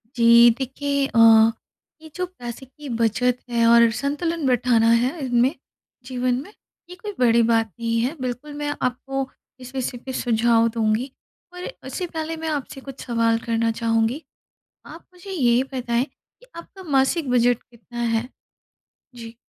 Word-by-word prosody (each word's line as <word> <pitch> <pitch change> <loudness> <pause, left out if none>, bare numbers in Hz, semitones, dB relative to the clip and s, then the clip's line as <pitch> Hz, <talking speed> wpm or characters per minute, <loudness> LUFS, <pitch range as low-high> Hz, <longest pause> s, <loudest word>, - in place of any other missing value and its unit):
जी 235 0 +7
देखिए 280 +1 -1
अ, 230 - 0 0.8
ये 315 - -12
जो 365 0 -2
पैसे 255 -7 -9
की 275 +2 -12
बचत 245 +2 +1
है 235 -1 +2
और 235 0 +6
संतुलन 295 +6 -2
बैठाना 240 -2 +3
है 250 +8 +1
इनमें, 245 +2 +2 0.5
जीवन 250 -1 -1
में, 405 +8 -13 0.4
ये 360 - -9
कोई 415 0 -7
बड़ी 235 -1 +4
बात 225 -2 +1
नहीं 230 0 0
है 265 +7 -1
बिल्कुल 255 +4 -5
मैं 290 0 -2
आपको 270 +2 -2 0.3
इस 255 +1 -11
विषय 250 -1 -3
पे 260 - -5
सुझाव 230 -1 +2
दूँगी, 225 +3 -1 0.4
पर 360 0 -7 0.2
उससे 365 - -4
पहले 325 0 -4
मैं 320 0 -5
आपसे 275 -2 -4
कुछ 270 -1 -10
सवाल 230 -2 +1
करना 230 0 +1
चाहूँगी। 225 +5 +1 0.7
आप 330 - -12
मुझे 360 +2 -12
ये 250 -8 +2
बताएँ 240 0 0
कि - - -25
आपका 380 +3 -11
मासिक 275 -1 +1
बजट 245 -1 +2
कितना 240 0 -13
है? 230 +1 0 0.9
जी। 230 -1 -10
250 Hz, 155 wpm, -22 LUFS, 235-285 Hz, 0.9 s, जी